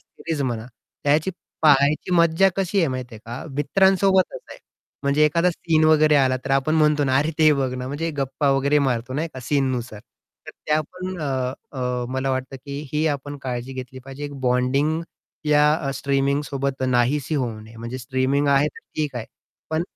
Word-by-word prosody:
Series 160 -4 -5
म्हणा. 120 -3 -3 0.4
त्याची 150 +5 +2 0.3
पाहायची 145 +4 +4
मज्जा 170 +3 +4
कशी 195 +1 0
आहे 165 - +3
माहिती 130 -2 -5
आहे - - -9
का? 120 +3 -6
मित्रांसोबतच 190 - +2
आहे - - -10 0.4
म्हणजे 140 +2 +3
एखादा 170 +4 +3
सीन 160 -2 +1
वगैरे 155 -1 +5
आला, 130 -2 +3
तर - - -4
आपण 135 +3 +2
म्हणतो 150 -2 +3
ना, 130 -1 +2
अरे, 150 +3 +1
ते 155 -1 +6
बघ 135 -3 0
ना, 125 0 -5
म्हणजे 155 +4 -2
गप्पा 140 +1 0
वगैरे 140 +2 +3
मारतो, 130 -2 -1
नाही 160 +4 -1
का? 130 - -6
सीननुसार 125 -5 -1 0.5
तर - - -7 0.2
त्या 155 0 +3
पण 185 0 -6
अ, 130 -2 -3
मला 130 +1 -1
वाटतं, 130 +1 -3
की 140 0 -5
ही 155 +1 +1
आपण 145 +1 -8
काळजी 125 0 -4
घेतली 130 0 -7
पाहिजे. 135 +2 -8
एक 145 -1 -6
बॉन्डिंग, 130 +5 +1 0.4
या 150 0 +3
स्ट्रीमिंगसोबत 140 0 -1
नाहीशी 130 +5 +1
होऊ 120 -6 -2
नये. 110 +1 -14
म्हणजे 115 +3 -6
स्ट्रीमिंग 130 +3 0
आहे 140 +1 +4
तर - - -13 0.2
ठीक 150 -3 -1
आहे. 115 - -5 0.4
पण 160 +1 0
140 Hz, 175 wpm, -23 LUFS, 130-155 Hz, 0.5 s, ते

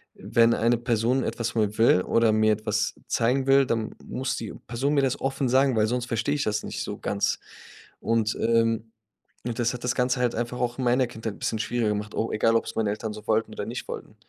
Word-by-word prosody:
wenn 115 0 +3
eine 115 +1 +2
Person 120 +2 +1
etwas 115 -1 -2
von 110 -2 +1
mir 105 +1 -3
will 115 -5 +5
oder 115 -1 +3
mir 110 0 +3
etwas 105 0 -1
zeigen 130 +3 +1
will, 135 0 +5
dann 115 -2 -2
muss 130 +1 -3
die 110 - -5
Person 130 +5 -1
mir 140 - +3
das 135 -1 0
offen 135 -1 -1
sagen, 130 0 +3
weil 110 0 +3
sonst 125 +1 -1
verstehe 120 +5 -1
ich 145 - -1
das 105 0 -1
nicht - - -4
so - - -6
ganz. - - -1 0.6
Und, 115 -1 0
ähm 115 -1 +1 0.6
und 115 - -3
das 120 +1 +1
hat 120 - -7
das 125 0 0
Ganze 125 0 +1
halt 120 -1 +1
einfach 120 +1 -3
auch 120 0 -1
in 130 - -2
meiner 125 +1 +3
Kindheit 110 -3 -5
'n - - -18
bisschen 110 - -1
schwieriger 115 -1 0
gemacht, 105 0 -3
o 115 - -1
egal 115 +1 +2
ob 115 - +2
es - - -7
meine 110 -2 +1
Eltern 110 +1 -4
so 105 0 -10
wollten 110 +1 +1
oder - - -4
nicht - - -6
wollten. - - -7
115 Hz, 235 wpm, -26 LUFS, 110-125 Hz, 0.6 s, will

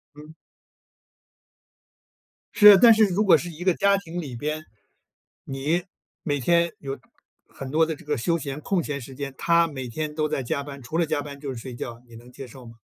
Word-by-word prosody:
嗯。 150 +2 -13 2.2
是， 205 -2 +9
但 230 +3 +8
是 220 0 +5
如 195 +1 0
果 180 -6 +6
是 175 +3 -6
一 170 +1 -8
个 185 -1 +3
家 200 +3 +3
庭 175 -3 -7
里 135 -6 -7
边， 155 +5 -4 0.8
你 145 +6 -1 0.4
每 145 -2 -1
天 170 +5 +2
有 135 -1 -5 0.5
很 135 - -8
多 160 +2 +3
的 160 0 -4
这 160 - -17
个 150 -1 -1
休 165 +8 0
闲 145 -3 -6
空 190 +2 0
闲 145 -2 -4
时 135 +1 -10
间， 140 0 -6
他 170 0 +3
每 135 -5 -6
天 150 +6 -4
都 155 -1 0
在 150 -2 -2
加 140 +3 -2
班， 140 -1 -9
除 155 +7 -5
了 170 - +2
加 155 -2 -1
班 145 -1 -9
就 140 -1 -5
是 - - -8
睡 120 +1 -8
觉， 120 0 -7
你 120 - -15
能 120 +2 -14
接 130 +1 -10
受 125 +1 -13
吗？ 115 0 -13
150 Hz, 225 characters per minute, -24 LUFS, 135-170 Hz, 2.2 s, 是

